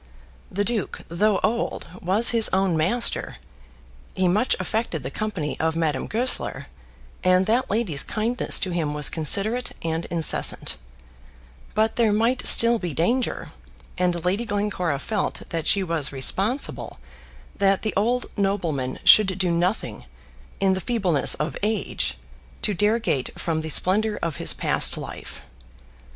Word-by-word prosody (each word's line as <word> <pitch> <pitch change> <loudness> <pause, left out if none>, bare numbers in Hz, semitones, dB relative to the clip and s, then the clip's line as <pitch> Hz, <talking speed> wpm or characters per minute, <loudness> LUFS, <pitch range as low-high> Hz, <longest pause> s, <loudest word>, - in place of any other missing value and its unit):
The 200 +2 -1
duke, 220 -2 -2
though 200 +4 +1
old, 235 +2 -1 0.2
was 195 +7 +3
his 230 -2 +5
own 190 -2 +1
master; 190 +10 -1 0.8
he 185 -1 +1
much 210 +8 +2
affected 185 - -3
the 130 - -6
company 190 -8 -4
of 160 0 0
Madame 155 -5 -1
Goesler, 245 +4 0 0.6
and 185 +1 +3
that 235 +5 0
lady's 200 -9 +2
kindness 225 +3 +2
to 185 - -2
him 155 -4 -2
was 150 -1 +2
considerate 205 +10 +1
and 165 0 -2
incessant; 165 -3 0 1.0
but 220 +1 +1
there 230 -3 +3
might 230 +5 +1
still 235 0 +6
be 175 -7 -5
danger, 240 +10 -1 0.5
and 180 -2 -1
Lady 195 +6 0
Glencora 200 -8 -2
felt 210 +8 -4
that 165 -1 -4
she 200 -1 +4
was 165 -5 -1
responsible 195 - 0 0.6
that 195 -1 +1
the 215 - -2
old 240 +5 0
nobleman 170 -11 -2
should 190 -4 +6
do 185 -2 0
nothing, 170 - -2 0.5
in 190 -1 +2
the 190 - -3
feebleness 185 - +2
of 150 -2 -4
age, 210 - -1 0.5
to 210 - +1
derogate 210 - -1
from 160 -2 -2
the 160 - -6
splendour 210 +7 +1
of 165 -4 -3
his - - +3
past - - +1
life. - - -9
190 Hz, 140 wpm, -23 LUFS, 165-220 Hz, 1.0 s, still